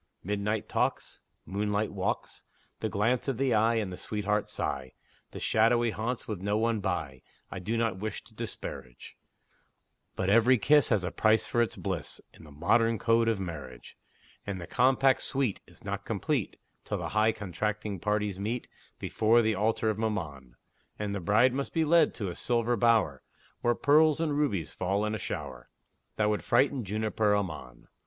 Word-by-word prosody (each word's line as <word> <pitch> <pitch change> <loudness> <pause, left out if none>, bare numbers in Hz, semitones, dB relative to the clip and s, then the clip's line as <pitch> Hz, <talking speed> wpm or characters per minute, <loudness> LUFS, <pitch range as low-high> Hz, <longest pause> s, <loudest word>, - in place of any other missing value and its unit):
Midnight 105 +2 -2
talks, - - -1 0.3
Moonlight 105 +2 -1
walks, - - -3 0.4
The - - -2
glance 115 +6 0
of 135 -4 -1
the 135 -1 +1
eye 110 +2 +3
and 95 -5 -2
sweetheart 105 0 -1
sigh, 65 -2 -4 0.4
The - - -8
shadowy 115 +1 +3
haunts, 115 +4 -3
with 105 -5 -4
no 105 +2 0
one 115 0 +1
by, 75 -9 -3 0.3
I 95 - -5
do 110 +6 -2
not 115 -5 0
wish 110 +1 -4
to - - -18
disparage; 65 -2 -8 1.0
But 95 - -2
every 115 +5 +5
kiss 145 +6 +4
Has 105 -5 +2
a 90 - -2
price 110 0 +3
for 120 - +1
its 115 - 0
bliss, 95 -6 -4
In - - -15
the - - -13
modern 115 +10 +2
code 115 +1 +2
of 115 -3 +1
marriage; 75 -9 -7 0.5
And 100 -2 -4
the 85 - -6
compact 130 +6 +3
sweet 130 -7 -1
Is - - -19
not - - -4
complete - - -2 0.2
Till - - -3
the - - -4
high 110 +1 +3
contracting 105 +1 -3
parties 105 0 -1
meet 115 +4 -3 0.3
Before 115 +2 +2
the 110 0 +2
altar 110 +2 +1
of 105 - -5
Mammon; 75 - -3 0.4
And 105 -1 -3
the 100 - -2
bride 105 +8 +3
must 140 +1 -3
be 160 -1 +2
led 165 0 +4
to 100 -5 -3
a - - -5
silver 120 +4 0
bower, 110 - +2 0.4
Where 120 0 +2
pearls 155 +3 +4
and 155 -3 0
rubies 115 - -1
fall 100 +3 0
in 105 - -2
a 110 - -3
shower - - -6 0.5
That 105 0 +2
would 105 - -2
frighten 135 -2 +2
Jupiter 105 +1 0
Ammon! 75 -11 -5
105 Hz, 175 wpm, -29 LUFS, 95-115 Hz, 1.0 s, every